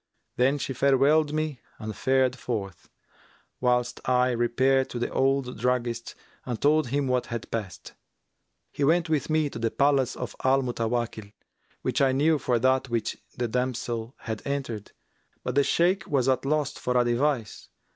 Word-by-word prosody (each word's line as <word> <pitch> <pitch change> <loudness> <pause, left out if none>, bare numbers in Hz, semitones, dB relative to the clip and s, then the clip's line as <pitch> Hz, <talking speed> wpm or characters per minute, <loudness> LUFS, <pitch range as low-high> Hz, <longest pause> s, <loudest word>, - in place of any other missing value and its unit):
Then 135 +3 +3
she 135 - -3
farewelled 140 +4 +3
me 155 -4 -2 0.2
and 110 -1 -6
fared 130 -1 +2
forth, 105 -8 -5 0.7
whilst 125 -1 +1
I 125 0 +3
repaired 130 +3 +2
to - - -5
the 120 - -2
old 135 -3 0
druggist 120 -1 -1 0.3
and 120 -4 -4
told 150 -1 +3
him 140 +3 0
what 125 -1 0
had 115 -1 -6
passed. 105 -5 -5 0.8
He 145 - -3
went 165 +3 +3
with 155 -3 0
me 155 -1 +2
to - - -6
the 115 0 +1
palace 140 0 +2
of - - -6
Al 135 +1 +3
Mutawakkil 115 -3 -2 0.5
which - - 0
I 135 -1 +4
knew 150 +3 +3
for 125 -1 +1
that 130 +2 +2
which 115 -2 -1 0.2
the 120 -1 0
damsel 120 -1 -2
had 110 -2 -4
entered; 135 -7 -4 0.5
but 125 - -2
the 140 +2 +4
Shaykh 175 +6 +2
was 135 -3 +1
at 130 0 +1
a - - -1
loss 150 -1 +1
for 125 0 -1
a 120 - +3
device. 120 -1 -1
130 Hz, 165 wpm, -26 LUFS, 120-140 Hz, 0.8 s, I